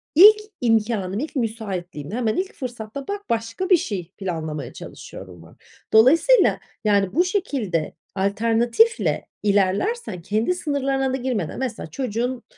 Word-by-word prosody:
ilk 415 Hz, +7 st, +9 dB, 0.2 s
imkânım, 215 Hz, -4 st, +1 dB
ilk 305 Hz, +4 st, -5 dB
müsaitliğim, 195 Hz, -, -4 dB
hemen 225 Hz, -1 st, 0 dB
ilk 380 Hz, +1 st, -2 dB
fırsatta; 245 Hz, +1 st, -7 dB
bak, 405 Hz, 0 st, -3 dB
başka 230 Hz, -, -2 dB
bir 365 Hz, -, +7 dB
şey 185 Hz, -, -4 dB
planlamaya 155 Hz, -7 st, -4 dB
çalışıyorum." 90 Hz, -3 st, -10 dB
var. 80 Hz, -, -17 dB, 0.4 s
Dolayısıyla 315 Hz, -, +5 dB, 0.3 s
yani 200 Hz, -1 st, +2 dB
bu 350 Hz, +3 st, +4 dB
şekilde 260 Hz, -, -1 dB, 0.2 s
alternatifle 230 Hz, -, +2 dB, 0.2 s
ilerlersen 205 Hz, -, 0 dB
kendi 215 Hz, -, 0 dB
sınırlarına 275 Hz, -4 st, -1 dB
da -, -, 0 dB
girmeden 245 Hz, -10 st, -3 dB
Mesela 260 Hz, -10 st, -4 dB
çocuğun 245 Hz, -, -2 dB
230 Hz, 125 wpm, -23 LUFS, 195-275 Hz, 0.4 s, ilk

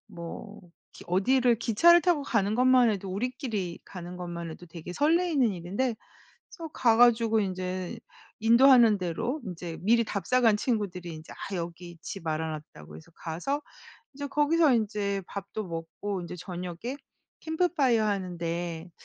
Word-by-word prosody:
뭐 170 Hz, +5 st, -9 dB, 0.3 s
기 -, -, -12 dB
어디를 240 Hz, +6 st, +3 dB
기차를 340 Hz, +11 st, +5 dB
타고 345 Hz, -6 st, +2 dB
가는 215 Hz, -5 st, 0 dB
것만 250 Hz, -1 st, +5 dB
해도 195 Hz, -2 st, -3 dB
우리끼리 215 Hz, -, -3 dB
가는 180 Hz, -1 st, -9 dB
것만 170 Hz, -1 st, -5 dB
해도 175 Hz, +2 st, -10 dB
되게 170 Hz, +1 st, -9 dB
설레는 300 Hz, -, +2 dB
일인데 205 Hz, +8 st, -2 dB, 0.5 s
그래서 330 Hz, -1 st, -8 dB
가 230 Hz, -3 st, +3 dB
가지고 230 Hz, -2 st, +5 dB
인제 185 Hz, -2 st, -3 dB, 0.4 s
인도하는 235 Hz, -1 st, +6 dB
대로 185 Hz, -, -2 dB
인제 175 Hz, -3 st, -6 dB
미리 230 Hz, +3 st, +4 dB
답사 215 Hz, +6 st, 0 dB
간 225 Hz, -3 st, +5 dB
친구들이 195 Hz, -7 st, -2 dB
인제 155 Hz, +1 st, -11 dB
"아 195 Hz, -2 st, -6 dB
여기 170 Hz, 0 st, -7 dB
집 170 Hz, -1 st, -7 dB
알아 160 Hz, 0 st, -1 dB, 0.2 s
놨다."고 75 Hz, 0 st, -12 dB
해서 80 Hz, -, -15 dB
가서 180 Hz, -, -3 dB, 0.5 s
이제 285 Hz, +1 st, -5 dB
거기서 295 Hz, +1 st, +3 dB
인제 205 Hz, -3 st, -1 dB
밥도 200 Hz, +1 st, -6 dB
먹고 170 Hz, +4 st, -5 dB
인제 175 Hz, -, -7 dB
저녁에 180 Hz, -, -6 dB, 0.4 s
캠프파이어 305 Hz, -9 st, +1 dB
하는데 175 Hz, -3 st, -3 dB
200 Hz, 310 characters per minute, -28 LUFS, 175-250 Hz, 0.5 s, 인도하는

